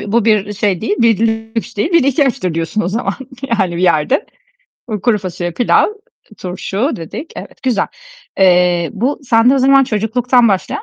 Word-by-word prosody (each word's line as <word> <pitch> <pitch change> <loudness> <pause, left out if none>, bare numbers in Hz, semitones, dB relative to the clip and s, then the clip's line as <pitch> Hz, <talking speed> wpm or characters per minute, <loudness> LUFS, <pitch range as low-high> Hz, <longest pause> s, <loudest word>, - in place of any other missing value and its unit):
bir 205 - -6
bu 235 -1 +2
belirli 215 -3 +2
bir - - -4
şey 200 -3 -1
değil, 220 - -1 0.8
bir 335 - +2
ihtiyaçtır 265 - 0
diyorsun, 165 +6 -2
o 175 - -1
zaman, 225 +6 -2 0.3
hani 190 -7 0
bir 175 - -2
yerde. 175 - +2 0.8
Kuru 235 -3 +2
fasulye, 180 -2 -4
pilav, 240 +8 +3 0.5
turşu 195 - -3
dedik. 170 - -8
Evet. - - -10
Güzel. 250 -6 0 0.5
Eee, 180 -2 +3
bu 245 +7 -1
sende 240 0 +3
o - - +2
zaman, 270 +1 +5
çocukluktan 240 +2 +1
başlayan 195 -2 -2
215 Hz, 155 wpm, -15 LUFS, 185-250 Hz, 0.8 s, zaman